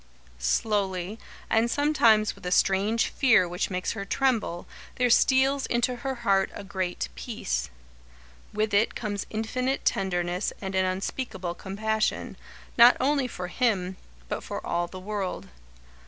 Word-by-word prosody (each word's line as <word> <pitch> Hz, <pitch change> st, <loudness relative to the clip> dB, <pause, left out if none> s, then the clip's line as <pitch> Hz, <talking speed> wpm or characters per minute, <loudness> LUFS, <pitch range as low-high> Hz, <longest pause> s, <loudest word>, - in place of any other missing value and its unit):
Slowly, 190 Hz, -, 0 dB, 0.3 s
and 225 Hz, +1 st, +2 dB
sometimes 235 Hz, -7 st, +3 dB
with -, -, -18 dB
a -, -, -2 dB
strange 200 Hz, +5 st, +2 dB
fear 225 Hz, -9 st, +4 dB
which 175 Hz, +2 st, -2 dB
makes 180 Hz, -1 st, -2 dB
her 210 Hz, -3 st, -4 dB
tremble, 220 Hz, -6 st, 0 dB, 0.3 s
there 245 Hz, -1 st, +2 dB
steals 265 Hz, +3 st, +4 dB
into 240 Hz, +1 st, 0 dB
her 265 Hz, +2 st, -3 dB
heart 195 Hz, -2 st, +3 dB
a -, -, -7 dB
great 185 Hz, -, -3 dB
peace. 60 Hz, 0 st, -3 dB, 0.8 s
With 215 Hz, 0 st, -1 dB
it 205 Hz, +3 st, +3 dB
comes 205 Hz, -3 st, -3 dB
infinite 250 Hz, +5 st, -2 dB
tenderness 180 Hz, -1 st, 0 dB
and 190 Hz, -1 st, -5 dB
an 190 Hz, 0 st, +2 dB
unspeakable 185 Hz, -1 st, -3 dB
compassion, 215 Hz, +4 st, -2 dB, 0.4 s
not 240 Hz, +1 st, +9 dB
only 275 Hz, 0 st, +2 dB
for 180 Hz, -6 st, -6 dB
him, 190 Hz, -5 st, 0 dB, 0.3 s
but -, -, -4 dB
for -, -, -6 dB
all 175 Hz, 0 st, -1 dB
the 185 Hz, +2 st, -9 dB
world. 195 Hz, -1 st, -4 dB
205 Hz, 140 wpm, -27 LUFS, 185-235 Hz, 0.8 s, not